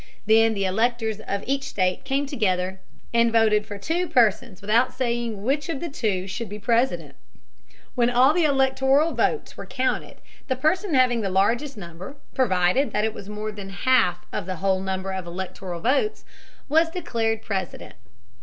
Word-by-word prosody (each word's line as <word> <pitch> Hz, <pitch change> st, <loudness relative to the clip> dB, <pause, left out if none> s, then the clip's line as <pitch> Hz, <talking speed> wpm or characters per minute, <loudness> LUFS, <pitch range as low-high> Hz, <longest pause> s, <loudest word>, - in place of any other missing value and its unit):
Then 225 Hz, +1 st, +4 dB
the 195 Hz, -1 st, -1 dB
electors 220 Hz, +2 st, 0 dB
of 200 Hz, -2 st, -4 dB
each 275 Hz, +1 st, 0 dB
state 185 Hz, +1 st, -1 dB
came 275 Hz, +1 st, 0 dB
together 190 Hz, -8 st, -1 dB, 0.3 s
and 235 Hz, 0 st, +4 dB
voted 215 Hz, -2 st, +3 dB
for 205 Hz, -, -6 dB
two 335 Hz, -, -1 dB
persons 220 Hz, -, +2 dB
without 230 Hz, +5 st, +2 dB
saying 235 Hz, -5 st, -2 dB
which 285 Hz, +7 st, 0 dB
of 305 Hz, -5 st, -2 dB
the 340 Hz, -, -4 dB
two 205 Hz, -9 st, -1 dB
should 210 Hz, +4 st, -5 dB
be 205 Hz, -, -6 dB
President. 205 Hz, -, 0 dB, 0.8 s
When 240 Hz, -1 st, +2 dB
all 250 Hz, +4 st, +5 dB
the 345 Hz, 0 st, +2 dB
electoral 270 Hz, +2 st, +3 dB
votes 445 Hz, -, -1 dB
were -, -, -8 dB
counted, 260 Hz, -1 st, -2 dB, 0.3 s
the 260 Hz, -, 0 dB
person 320 Hz, +6 st, +1 dB
having 250 Hz, -3 st, +3 dB
the 195 Hz, -, -1 dB
largest 230 Hz, +8 st, +1 dB
number, 175 Hz, -, -9 dB, 0.2 s
provided 210 Hz, +2 st, +2 dB
that 215 Hz, +1 st, 0 dB
was 200 Hz, -1 st, -9 dB
more 210 Hz, +1 st, -4 dB
than 200 Hz, -2 st, -8 dB
half 185 Hz, -3 st, +2 dB
of -, -, -3 dB
the 185 Hz, -, -3 dB
whole 190 Hz, +2 st, 0 dB
number 190 Hz, 0 st, -3 dB
of 190 Hz, -2 st, -5 dB
electoral 180 Hz, 0 st, -6 dB
votes, 275 Hz, -, 0 dB, 0.4 s
was 320 Hz, +3 st, +3 dB
declared 225 Hz, -10 st, -2 dB
President. 190 Hz, -4 st, -4 dB
225 Hz, 165 wpm, -24 LUFS, 195-265 Hz, 0.8 s, all